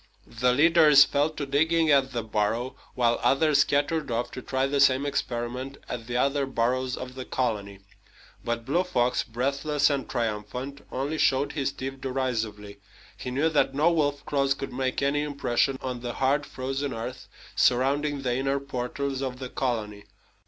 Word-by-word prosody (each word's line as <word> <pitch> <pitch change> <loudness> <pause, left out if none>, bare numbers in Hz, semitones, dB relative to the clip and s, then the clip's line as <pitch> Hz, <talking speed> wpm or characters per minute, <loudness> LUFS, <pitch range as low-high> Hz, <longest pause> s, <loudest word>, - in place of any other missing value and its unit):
The 125 +2 +1
leaders 150 0 +7
fell 145 +2 +1
to 150 -2 -5
digging 160 +3 +2
at 135 -2 +3
the 120 -2 -3
burrow, 110 +4 -1 0.2
while 120 -2 +2
others 145 +1 +3
scattered 145 +2 +1
off 120 +1 -2
to 130 - -7
try 130 +1 -1
the 140 +1 0
same 140 0 +4
experiment 130 -1 -3
at 120 -2 -6
the 120 0 -2
other 140 +1 +1
burrows 130 +1 0
of 130 0 -7
the 130 0 -6
colony. 100 -7 -2 0.6
But 120 -1 -3
Blue 170 +8 +1
Fox, 125 -6 +1
breathless 140 +5 0
and 140 -2 -2
triumphant, 120 +4 -3
only 145 +4 -2
showed 135 +2 +2
his 140 -3 -1
teeth 135 0 -6
derisively. 110 -6 -3 0.4
He - - -6
knew 140 +5 +1
that 145 -3 +1
no 155 +4 +4
wolf 145 -3 0
claws 140 -1 +1
could 135 - -6
make 130 +1 -1
any 140 +1 +1
impression 140 -2 0
on 125 -2 -3
the 120 0 -5
hard 140 +3 +1
frozen 135 +1 -3
earth 115 +3 -6 0.3
surrounding 140 +3 +2
the 125 -2 0
inner 135 +2 0
portals 135 0 -3
of 130 -2 -3
the 130 -1 -6
colony. 105 -6 -3
135 Hz, 165 wpm, -26 LUFS, 125-140 Hz, 0.6 s, leaders